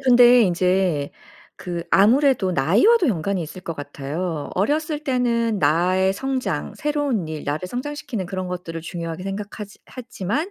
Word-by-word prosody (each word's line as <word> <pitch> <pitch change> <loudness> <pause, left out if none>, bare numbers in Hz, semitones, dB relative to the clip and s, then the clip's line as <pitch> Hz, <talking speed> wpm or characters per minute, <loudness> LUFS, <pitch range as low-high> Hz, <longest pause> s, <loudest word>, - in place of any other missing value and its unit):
근데 245 -2 +7
이제 180 -5 +1 0.5
그 175 -2 -5
아무래도 235 0 +4
나이와도 220 - +4
연관이 190 -2 -1
있을 170 +4 -8
것 170 -2 -5
같아요. 145 +3 -5
어렸을 300 - 0
때는 235 -4 +1
나의 180 +6 +3
성장 255 - -3
새로운 290 - -1
일 155 -1 -6
나를 155 +5 -3
성장시키는 270 -4 -4
그런 185 0 -4
것들을 170 -2 -5
중요하게 165 +1 -6
생각하지 205 +1 -6 0.2
했지만 250 - -3
195 Hz, 330 characters per minute, -22 LUFS, 170-250 Hz, 0.5 s, 근데